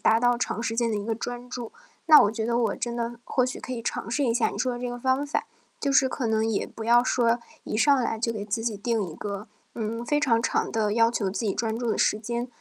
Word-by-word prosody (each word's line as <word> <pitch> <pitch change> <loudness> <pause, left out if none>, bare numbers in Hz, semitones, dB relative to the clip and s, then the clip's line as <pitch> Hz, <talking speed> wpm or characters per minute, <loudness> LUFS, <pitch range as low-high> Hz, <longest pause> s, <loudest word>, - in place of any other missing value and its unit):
达 225 +1 +4
到 245 -1 +3
长 230 - -2
时 225 0 -2
间 235 -1 +2
的 220 - -1
一 205 -1 -2
个 225 - -1
专 245 +2 -5
注。 245 -2 -6 0.3
那 310 -2 +9
我 205 - +4
觉 220 0 -3
得 235 +1 +1
我 235 - +1
真 235 -1 -3
的 235 0 -3
或 255 -1 +1
许 255 - -4
可 255 - -7
以 235 - -3
尝 230 - -3
试 285 +3 +1
一 230 - +1
下 240 - +2
你 - - -7
说 255 - +1
的 - - -6
这 250 - -3
个 245 - -5
方 260 +3 +1
法， 285 - -1 0.4
就 280 - 0
是 270 -1 +5
可 255 -1 -2
能 220 0 +1
也 225 -2 0
不 225 - -8
要 240 +1 +5
说， 240 -1 +2 0.2
一 215 - -3
上 285 +2 +5
来 235 -3 -1
就 230 +1 0
给 210 -3 -4
自 215 +2 -2
己 225 -3 -1
定 225 +1 0
一 155 - -9
个， 205 +1 -5 0.3
嗯， 230 +1 -3
非 295 +3 +1
常 230 -5 +2
长 - - 0
的 215 -2 0
要 230 +1 +4
求 200 -5 -1
自 210 +3 -3
己 195 - 0
专 225 -1 -1
注 240 -2 -1
的 - - 0
时 210 - +2
间， 235 +2 -3
235 Hz, 305 characters per minute, -26 LUFS, 220-245 Hz, 0.4 s, 那